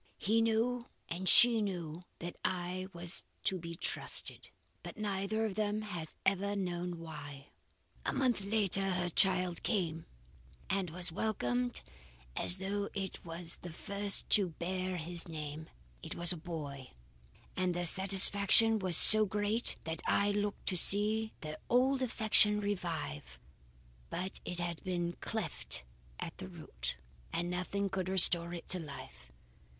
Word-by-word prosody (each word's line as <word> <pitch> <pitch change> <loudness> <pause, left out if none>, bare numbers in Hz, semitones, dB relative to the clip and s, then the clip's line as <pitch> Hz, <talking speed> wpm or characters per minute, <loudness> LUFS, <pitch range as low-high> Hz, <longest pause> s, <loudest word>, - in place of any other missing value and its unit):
He 220 +4 0
knew 230 +2 -1 0.2
and 180 +2 +1
she 235 -2 +6
knew 175 -4 -6
that 175 +1 -8
I 185 +1 -4
was 170 -1 -2 0.2
to 190 - -1
be 170 0 -8
trusted; - - -1 0.3
but - - -11
neither 210 +1 -3
of 215 - -4
them 210 +1 -3
has 175 -7 -8
ever 200 +1 0
known 180 -2 -4
why. 145 -4 -11 0.5
A - - -2
month 255 -6 -1
later 195 -2 +1
her 180 -1 -2
child 180 -1 0
came, 170 -7 -3 0.6
and 195 -2 -2
was 175 +1 0
welcomed 125 - -3 0.5
as 180 - +6
though 200 +2 -4
it 195 -2 -6
were 170 +1 -9 0.2
the 175 - -9
first 200 +4 +1
to 200 -4 +3
bear 185 +1 -4
his 170 +1 -1
name. 155 -1 -8 0.3
It 160 - -8
was 175 +1 +5
a - - -8
boy, 150 - -8 0.6
and 185 -1 -2
their 175 0 -3
satisfaction 200 +4 +6
was 185 -4 +3
so 215 -1 +10
great 210 +4 -1
that 160 0 -5
I 205 0 +1
looked 205 0 -4
to 185 - -1
see 215 +4 +6
their 155 -1 -7
old 260 +2 +2
affection 220 -3 +3
revive. 165 - -5 0.7
But 185 +1 -6
it 180 - -5
had 175 -1 -5
been 175 -2 -3
cleft - - -4 0.4
at - - -8
the - - -7
root, 60 0 -7 0.3
and 175 +1 -3
nothing 190 +3 -3
could 185 -1 -4
restore 175 -2 +4
it 175 -1 -9
to 185 - -2
life. 140 - -11
185 Hz, 145 wpm, -32 LUFS, 170-205 Hz, 0.7 s, so